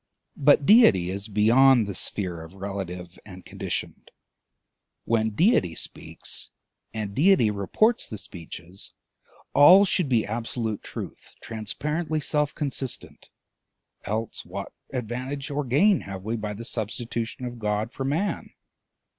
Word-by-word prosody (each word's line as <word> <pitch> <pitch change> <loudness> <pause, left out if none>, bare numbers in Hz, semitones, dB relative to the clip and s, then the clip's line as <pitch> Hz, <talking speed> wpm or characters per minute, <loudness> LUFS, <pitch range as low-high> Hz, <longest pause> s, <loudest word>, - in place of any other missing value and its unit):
But 145 0 +5
deity 100 - +6
is 100 +2 -5
beyond 115 +4 +5
the 100 - -4
sphere 90 -3 -3
of 80 +2 -11
the - - -16
relative 90 -3 -6
and 95 -3 -12
conditioned. - - -5 1.0
When 110 -1 +2
deity 105 - +2
speaks - - -5 0.4
and 105 -2 -4
deity 150 - +4
reports 160 - +1
the 110 - -6
speeches, 90 +1 -9 0.6
all 180 +8 +8
should 180 -6 +1
be 115 -4 +2
absolute 115 0 -3
truth - - -9
transparently 150 +9 -3
self 150 -1 0
consistent, 135 -3 -4 0.7
else 110 +2 -3
what 100 +3 -7 0.2
advantage 130 +3 -4
or 145 +1 -1
gain 155 - +4
have 95 -1 -7
we 110 +3 -2
by 105 -2 -4
the 115 +3 -6
substitution 115 +2 -3
of 120 -1 -6
God 105 +1 -1
for 135 - -4
Man? 160 +10 -1
115 Hz, 130 wpm, -25 LUFS, 100-140 Hz, 1.0 s, all